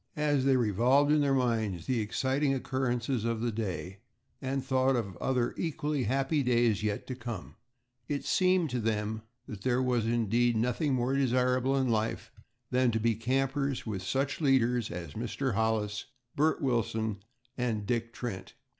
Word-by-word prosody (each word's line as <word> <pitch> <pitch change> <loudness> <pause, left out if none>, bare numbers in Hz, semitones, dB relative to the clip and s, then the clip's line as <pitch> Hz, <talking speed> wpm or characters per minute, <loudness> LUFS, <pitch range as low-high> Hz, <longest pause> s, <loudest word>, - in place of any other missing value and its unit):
As 145 -3 +1
they 135 -1 +4
revolved 125 +6 +3
in 150 0 +4
their 140 -1 +2
minds 110 -9 0
the 125 -3 0
exciting 135 +6 0
occurrences 125 -2 -1
of 115 -1 -1
the 120 +1 -1
day, 95 -3 -4 0.4
and 135 0 -2
thought 130 0 +2
of 100 -7 -2
other 125 -2 0
equally 150 -4 -1
happy 135 +6 +1
days 120 -4 +2
yet 105 -1 -2
to 130 - -4
come, 120 -6 -7 0.5
it 145 -1 -3
seemed 185 -5 +2
to 125 - -1
them 110 -1 -1 0.3
that 105 -7 -8
there 125 +2 +1
was 125 -3 +1
indeed 120 +1 +2
nothing 125 +5 +1
more 125 +1 0
desirable 130 0 +2
in 130 -1 +1
life 110 -1 -1 0.4
than 125 0 +3
to 110 -1 0
be 115 +1 +2
campers 135 +4 -1
with 105 -5 -3
such 135 - -1
leaders 125 -5 +2
as 85 -4 -6
Mr. 120 +3 -2
Hollis, 105 -2 0 0.3
Bert 155 +1 +2
Wilson, 110 -5 0 0.3
and 115 -4 -1
Dick 115 +2 -1
Trent. 115 -6 -6
125 Hz, 160 wpm, -30 LUFS, 110-135 Hz, 0.5 s, they